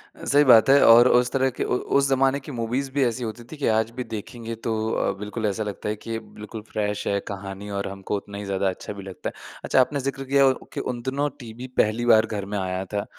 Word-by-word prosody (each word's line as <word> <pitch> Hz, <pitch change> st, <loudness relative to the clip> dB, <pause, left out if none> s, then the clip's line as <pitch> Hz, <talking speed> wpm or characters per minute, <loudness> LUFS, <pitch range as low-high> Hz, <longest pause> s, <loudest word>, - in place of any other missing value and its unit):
अ, -, -, -10 dB
सही 145 Hz, +1 st, +5 dB
बात 125 Hz, -3 st, +7 dB
है, 140 Hz, +1 st, +7 dB
और 120 Hz, +2 st, +8 dB
उस 125 Hz, 0 st, +3 dB
तरह 135 Hz, 0 st, +2 dB
के -, -, +2 dB
उ 125 Hz, -, 0 dB, 0.2 s
उस 140 Hz, 0 st, +4 dB
ज़माने 135 Hz, +1 st, +2 dB
की 145 Hz, -, -10 dB
मूवीज़ 125 Hz, +3 st, -2 dB
भी 140 Hz, 0 st, +1 dB
ऐसी 120 Hz, +1 st, -2 dB
होती 115 Hz, +1 st, -5 dB
थीं 155 Hz, -, -8 dB
कि 145 Hz, -, -1 dB
आज 110 Hz, 0 st, +2 dB
भी 125 Hz, -, -2 dB
देखेंगे 115 Hz, +1 st, -6 dB
तो 115 Hz, 0 st, -3 dB, 0.2 s
अ, -, -, +1 dB
बिल्कुल 105 Hz, +2 st, -4 dB
ऐसा 105 Hz, +1 st, -1 dB
लगता 105 Hz, 0 st, -5 dB
है 105 Hz, -, -1 dB
कि 110 Hz, +2 st, -9 dB
ये 115 Hz, -, -2 dB, 0.2 s
बिल्कुल 105 Hz, +1 st, -7 dB
फ़्रेश 105 Hz, -1 st, -2 dB
है 100 Hz, -, +1 dB
कहानी 100 Hz, +1 st, -7 dB
और 100 Hz, -, -3 dB
हमको 95 Hz, +1 st, -4 dB
उतना 100 Hz, 0 st, -8 dB
ही 100 Hz, -, -6 dB
ज़्यादा 100 Hz, 0 st, 0 dB
अच्छा 95 Hz, -, -6 dB
भी 100 Hz, -1 st, -9 dB
लगता 95 Hz, -1 st, -6 dB
है। -, -, -14 dB, 0.3 s
अच्छा, 130 Hz, -, +4 dB
आपने 140 Hz, +3 st, 0 dB
ज़िक्र 135 Hz, 0 st, -3 dB
किया 140 Hz, +1 st, +4 dB
उ 130 Hz, -, +4 dB, 0.2 s
कि -, -, -3 dB
उन 120 Hz, -1 st, -3 dB
दिनों 140 Hz, +4 st, -1 dB
टीवी 120 Hz, 0 st, -8 dB
पहली 110 Hz, +3 st, +2 dB
बार 110 Hz, -2 st, +6 dB
घर 105 Hz, -3 st, -4 dB
में 105 Hz, +1 st, -4 dB
आया 95 Hz, 0 st, -2 dB
था, 100 Hz, +1 st, -3 dB
115 Hz, 260 wpm, -24 LUFS, 105-130 Hz, 0.3 s, और